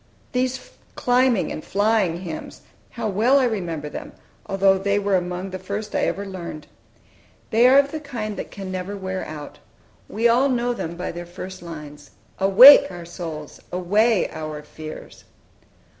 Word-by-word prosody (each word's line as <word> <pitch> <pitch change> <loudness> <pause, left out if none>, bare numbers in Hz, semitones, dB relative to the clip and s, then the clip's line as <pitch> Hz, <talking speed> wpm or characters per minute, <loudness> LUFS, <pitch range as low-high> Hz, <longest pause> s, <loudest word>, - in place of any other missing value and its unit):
These 255 0 -2 0.2
climbing 250 -3 +2
and 155 - -6
flying 200 -4 +1
hymns, 165 -4 -7 0.3
how 230 -2 -4
well 220 +7 +3
I 270 - +3
remember 175 -10 -2
them, 150 - -8 0.3
although 195 0 +3
they 200 +1 +1
were 200 -1 +1
among 180 +1 -3
the 185 - -5
first 200 +3 -5
I - - +1
learned! 185 -6 -6 0.9
They 235 +3 +5
are 265 +2 +6
of 280 0 +4
the 315 - -4
kind 235 -8 -5
that - - -6
can 195 -2 -7
never 185 +2 -4
wear 190 -1 -4
out. 150 -1 -9 0.5
We 225 +3 +2
all 250 +4 +3
know 245 -1 0
them 170 -7 -5
by 180 - -4
their 175 0 -8
first 185 +2 -8
lines, 150 -3 -10 0.3
"Awake, 210 +9 +9
our 175 -1 -8
souls! 165 -4 -7
away, 205 +4 +2
our 155 -1 -6
fears!" 155 0 -10
195 Hz, 160 wpm, -22 LUFS, 175-230 Hz, 0.9 s, Awake